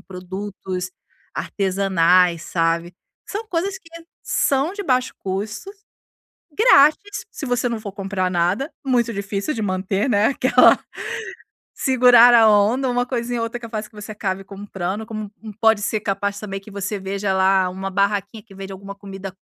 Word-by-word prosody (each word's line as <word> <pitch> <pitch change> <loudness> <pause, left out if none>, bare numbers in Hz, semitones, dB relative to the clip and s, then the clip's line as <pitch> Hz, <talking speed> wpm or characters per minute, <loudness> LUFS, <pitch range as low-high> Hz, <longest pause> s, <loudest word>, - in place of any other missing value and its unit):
produtos 185 0 -6 0.4
artesanais, 185 -3 +2
sabe. 170 0 -1 0.3
São 425 +3 -5
coisas 380 +2 -1
que 330 - -19 0.3
são 280 +5 +1
de 405 0 -5
baixo 255 -6 0
custo, 205 - -4 0.8
grátis, 355 - +4
se 290 - -6
você 245 -1 0
não 230 -2 -3
for 210 -2 -7
comprar 195 -2 -2
nada. 180 - 0
Muito 240 -3 +1
difícil 200 +6 -3
de 225 - -4
manter, 195 +3 -1
né, 210 -1 +3
aquela 255 -2 +5 0.9
"segurar 245 -2 +6
a 225 -2 +7
onda", 215 +6 +3
uma 245 0 0
coisinha 245 -1 -2
ou - - -1
outra 230 +1 -4
é - - -15
capaz 220 -2 -5
que 215 - -23
você 210 +1 -8
acabe 195 -2 -3
comprando, 195 +1 -5
como 215 -2 -5 0.2
um 220 - -7
um - - -9
pode 220 0 +3
ser 215 +1 -1
capaz 200 0 -2
também 195 -2 -5
que 200 +2 -14
você 200 +1 -4
veja 195 +1 -2
lá 190 0 +3
uma 190 +1 -5
barraquinha 200 +2 -1
que 200 -4 -16
vende 195 0 -8
alguma 200 +1 -9
comida 195 -1 -8
205 Hz, 165 wpm, -21 LUFS, 195-240 Hz, 0.9 s, a